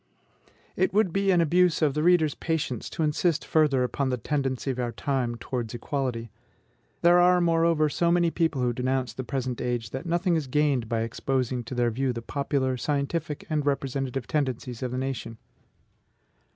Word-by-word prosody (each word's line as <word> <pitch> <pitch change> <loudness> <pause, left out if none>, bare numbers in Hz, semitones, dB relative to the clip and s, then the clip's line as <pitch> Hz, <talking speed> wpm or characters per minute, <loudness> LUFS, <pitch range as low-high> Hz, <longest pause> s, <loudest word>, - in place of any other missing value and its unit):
It 185 +1 +1
would 205 -5 +3
be 195 0 +1
an 180 -2 +5
abuse 175 +1 +3
of 145 -3 +3
the 150 - -1
reader's 160 -3 +4
patience 155 -8 -3
to 160 - -2
insist 155 +2 +1
further 150 -5 +3
upon 135 +2 -1
the 125 - 0
tendency 135 +1 -1
of 130 - -5
our 120 -1 -1
time 130 -3 -1
towards 120 -1 -4
equality. 120 -3 -3 0.7
There 175 +1 +6
are, 180 0 +5
moreover, 165 -2 +3
so 170 +4 +1
many 170 -1 +3
people 160 -7 0
who 120 -1 +1
denounce 130 +1 -1
the 130 - -5
present 130 -1 -3
age, 120 -2 -2
that 130 +5 -5
nothing 175 +1 +1
is 155 -4 -1
gained 135 -4 +1
by 115 -1 0
exposing 125 +2 -1
to 125 - -6
their 120 -1 +1
view 130 +2 -1
the 115 -1 -6
popular, 135 -1 -1
scientific, 150 +3 -2
and 155 -2 0
representative 135 -2 -2
tendencies 130 -5 -2
of 130 - -2
the 125 - -4
nation. 130 -3 -4
135 Hz, 180 wpm, -26 LUFS, 125-160 Hz, 0.7 s, There